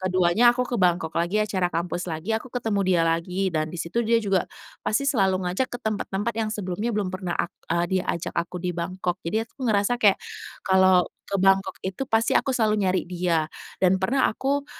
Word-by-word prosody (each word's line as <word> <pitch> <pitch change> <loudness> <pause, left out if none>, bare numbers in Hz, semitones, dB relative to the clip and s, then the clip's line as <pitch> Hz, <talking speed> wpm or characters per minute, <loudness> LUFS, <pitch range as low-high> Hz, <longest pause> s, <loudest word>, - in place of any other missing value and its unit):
ke-2-nya 185 +5 +4
aku 250 - +1
ke 245 - -1
Bangkok 175 -3 +2
lagi, 170 +4 0
acara 195 -4 0
kampus 175 +1 -2
lagi, 165 +7 -3
aku 225 - -7
ketemu 225 -5 -1
dia 180 -3 +3
lagi 180 +4 0
dan 155 -1 0
di - - -5
situ 175 +8 -1
dia 230 +1 +3
juga 195 -4 +1 0.4
pasti 260 +6 +1
selalu 195 -9 +2
ngajak 225 +9 -1
ke 245 - -4
tempat-tempat 215 0 -2
yang 220 -1 -1
sebelumnya 205 +2 -3
belum 205 -3 0
pernah 185 -2 -3
ak 175 - 0 0.2
eee, 170 +1 +2
diajak 170 -2 -3
aku 170 +1 -2
di 180 0 -2
Bangkok. 180 +1 -2
Jadi 215 +7 0
aku 225 - -32
ngerasa 205 +3 +2
kayak 205 -4 +5 0.5
kalau 190 -1 +5 0.2
ke 200 - -3
Bangkok 195 0 +3
itu 190 +7 -4
pasti 225 -2 +1
aku - - +1
selalu 220 -4 +2
nyari 185 -1 +1
dia. 175 -3 0 0.3
Dan 185 0 +4
pernah 240 +8 +2
aku 280 +4 -1
190 Hz, 195 wpm, -25 LUFS, 180-220 Hz, 0.5 s, kayak